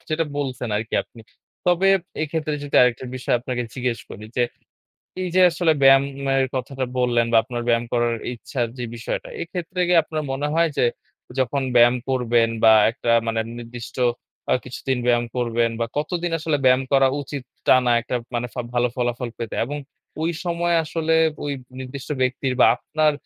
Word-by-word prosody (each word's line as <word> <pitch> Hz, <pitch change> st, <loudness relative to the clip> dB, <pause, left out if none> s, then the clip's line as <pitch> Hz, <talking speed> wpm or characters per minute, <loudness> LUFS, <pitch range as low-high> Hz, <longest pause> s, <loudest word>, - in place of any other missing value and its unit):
যেটা 160 Hz, +1 st, +1 dB
বলছেন 130 Hz, -4 st, -3 dB
আরকি 110 Hz, +2 st, -3 dB
আপনি। 115 Hz, -, -16 dB, 0.5 s
তবে 180 Hz, +2 st, +4 dB, 0.3 s
এক্ষেত্রে 155 Hz, 0 st, -2 dB
যেটা 145 Hz, -, -1 dB
আরেকটা 125 Hz, 0 st, +1 dB
বিষয় 125 Hz, -, 0 dB
আপনাকে 125 Hz, 0 st, -3 dB
জিজ্ঞেস 125 Hz, -3 st, -1 dB
করি 105 Hz, -, -9 dB
যে 125 Hz, -, +3 dB, 0.8 s
এই 185 Hz, -, -2 dB
যে 185 Hz, -, +5 dB
আসলে 165 Hz, 0 st, +2 dB
ব্যায়ামের 135 Hz, 0 st, +4 dB
কথাটা 130 Hz, +1 st, -3 dB
বললেন 120 Hz, -2 st, +2 dB
বা 115 Hz, -, +5 dB
আপনার 120 Hz, -1 st, -4 dB
ব্যায়াম 115 Hz, 0 st, +3 dB
করার 120 Hz, -1 st, +2 dB, 0.2 s
ইচ্ছার 120 Hz, 0 st, -3 dB
যে 125 Hz, -, -3 dB
বিষয়টা। 115 Hz, -, -4 dB
এক্ষেত্রে 180 Hz, +1 st, -5 dB
কি 180 Hz, -, +4 dB
আপনার 155 Hz, 0 st, -4 dB
মনে 145 Hz, +2 st, -2 dB
হয় 165 Hz, 0 st, +3 dB
যে -, -, +4 dB, 0.6 s
যখন 135 Hz, +2 st, 0 dB
ব্যায়াম 120 Hz, +1 st, +6 dB
করবেন 120 Hz, -3 st, +2 dB, 0.2 s
বা 110 Hz, -, +9 dB, 0.2 s
একটা 120 Hz, 0 st, -3 dB, 0.2 s
মানে 115 Hz, 0 st, 0 dB, 0.2 s
নির্দিষ্ট 120 Hz, 0 st, -9 dB, 0.6 s
আ -, -, +5 dB
কিছুদিন 130 Hz, +1 st, -3 dB
ব্যায়াম 120 Hz, -1 st, +3 dB
করবেন 120 Hz, -1 st, +1 dB
বা 115 Hz, -, +1 dB
কতদিন 175 Hz, +3 st, -2 dB
আসলে 155 Hz, -1 st, 0 dB
ব্যায়াম 130 Hz, 0 st, +5 dB
করা 135 Hz, -1 st, +5 dB
উচিত 140 Hz, -1 st, -6 dB, 0.2 s
টানা 125 Hz, -1 st, +5 dB
একটা 125 Hz, -, -3 dB, 0.2 s
মানে 120 Hz, +1 st, -1 dB
ফা 125 Hz, -, -2 dB
ভালো 120 Hz, 0 st, +2 dB
ফলাফল 120 Hz, 0 st, -1 dB
পেতে 115 Hz, -2 st, -5 dB
এবং 145 Hz, +5 st, -5 dB, 0.5 s
ওই 165 Hz, -, +1 dB
সময় 175 Hz, 0 st, 0 dB
আসলে 160 Hz, +1 st, 0 dB, 0.3 s
ঐ -, -, -4 dB, 0.4 s
নির্দিষ্ট 130 Hz, +2 st, -8 dB
ব্যক্তির 130 Hz, 0 st, 0 dB
বা -, -, +8 dB
আপনার 155 Hz, +3 st, +1 dB
130 Hz, 170 wpm, -22 LUFS, 120-150 Hz, 0.8 s, বা